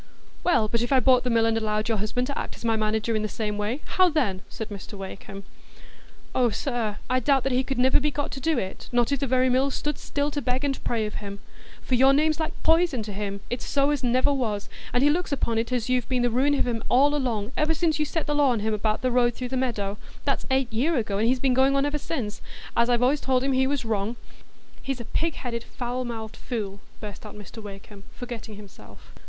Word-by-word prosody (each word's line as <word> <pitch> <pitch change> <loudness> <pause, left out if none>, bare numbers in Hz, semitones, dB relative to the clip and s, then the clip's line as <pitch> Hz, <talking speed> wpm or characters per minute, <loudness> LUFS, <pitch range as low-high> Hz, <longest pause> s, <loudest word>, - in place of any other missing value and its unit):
"Well, 230 -11 +3
but 230 +2 0
if 240 - -2
I 265 - +6
bought 255 -1 +5
the 250 - -1
mill, 230 -1 +3
and 225 0 +2
allowed 215 -1 0
your 225 -3 +1
husband 220 +5 -1
to 280 - -4
act - - -4
as - - -10
my 225 -1 +3
manager 220 +1 0
in 215 - +1
the 215 - -2
same 210 -1 -3
way, 225 +8 -2
how 370 -1 +4
then?" 235 - 0
said 220 - -6
Mr 205 0 -8
Wakem. 195 0 -8 0.9
"Oh, 250 -2 +3
sir, 225 -2 -2
I 255 0 +2
doubt 270 +1 +2
he 255 +1 +2
could 270 0 -3
niver 260 +1 +5
be 300 +1 +1
got 290 0 -3
to 270 - -5
do 315 +1 +1
it, 190 -5 -4
not 240 0 +2
if 280 - +1
the 275 - -1
very 255 +1 +3
mill 260 +2 +3
stood 295 +1 -3
still 285 +1 -1
to 290 - -2
beg 255 +1 -1
and 275 -1 -2
pray 225 -2 0
of 210 - -5
him. 200 -1 -6 0.5
For - - -3
your 265 +2 +6
name's 310 +2 +2
like 315 - -4
poison 325 -7 +3
to 210 -1 -6
him, 200 0 -4
it's 245 - -2
so 280 +1 +2
as 290 -3 -1
never 255 +3 +3
was; 215 -7 -2 0.2
and 245 - +2
he 290 - +6
looks 355 +2 -1
upon 235 -5 0
it 230 +2 -2
as 245 -3 0
you've 250 -2 0
been 250 -2 +1
the 245 - +2
ruin 275 +5 +3
of - - +1
him 230 -2 -2
all 280 +4 +5
along, 240 -6 -1
ever 310 +1 +2
since 320 -1 +1
you 300 - +2
set 320 +2 -2
the 295 - 0
law 290 -2 +4
on 235 -4 +1
him 220 +1 0
about 215 +2 0
the 255 - +2
road 240 -1 +3
through 250 -1 -4
the 260 - -3
meadow,—that's 215 -6 -2
eight 265 -3 +1
year 285 +9 +2
ago, 210 -5 0
and 225 - +3
he's 255 +1 +2
been 260 0 +2
going 265 +2 +4
on 275 0 +3
ever 295 +1 -1
since—as 235 -3 -3
I've 240 0 +3
allays 275 +3 +3
told 260 -1 +1
him 275 - +1
he 265 0 +3
was 275 -3 -1
wrong——" 215 +1 -1 0.7
"He's 270 -2 -3
a 235 - -6
pig 330 +6 -1
headed, 235 -3 -4
foul 250 +1 -4
mouthed 225 -2 -6
fool!" 205 -5 -4 0.2
burst 210 -2 -8
out 210 - -9
Mr 210 +2 -10
Wakem, 200 0 -10
forgetting 235 -3 -7
himself. 205 -2 -14
245 Hz, 245 wpm, -26 LUFS, 220-275 Hz, 0.9 s, I